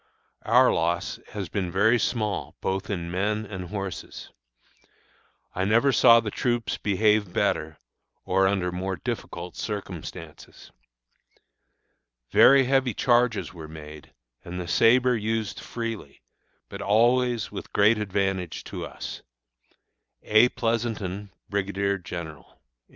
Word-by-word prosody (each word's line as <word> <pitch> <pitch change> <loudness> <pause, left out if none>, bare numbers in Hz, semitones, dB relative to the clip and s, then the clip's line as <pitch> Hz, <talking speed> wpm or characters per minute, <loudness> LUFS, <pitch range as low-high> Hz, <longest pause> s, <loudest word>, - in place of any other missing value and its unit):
Our - - +5
loss 85 +1 -1
has 100 -3 -4
been 90 +1 -3
very 110 +6 +3
small 110 -4 -2
both 95 0 -2
in 85 -4 -3
men 105 +4 -1
and 95 -3 -6
horses. 95 -6 -6 1.2
I 95 - -1
never 115 +7 +3
saw 115 -1 +7
the 110 -2 -4
troops 120 0 -1
behave 105 -1 +2
better, 80 -2 -1 0.5
or 95 +1 +3
under 95 -2 0
more 95 +2 -3
difficult 90 -5 -6
circumstances. 100 -6 -7 1.6
Very 135 0 +7
heavy 130 -3 +1
charges 120 -5 +2
were 80 -3 -9
made, 75 -1 -11 0.3
and 90 +1 -6
the 90 - -5
sabre 125 +6 +4
used 110 -1 -2
freely, 115 -11 -6 0.4
but - - -8
always 120 +2 +2
with - - -8
great 105 +2 +4
advantage 95 -4 -2
to - - -6
us. - - -8 1.0
A. 110 +3 +5
PLEASONTON, 110 -5 -2 0.2
Brigadier 100 0 -1
General. 85 -4 -8
100 Hz, 115 wpm, -26 LUFS, 90-115 Hz, 1.6 s, saw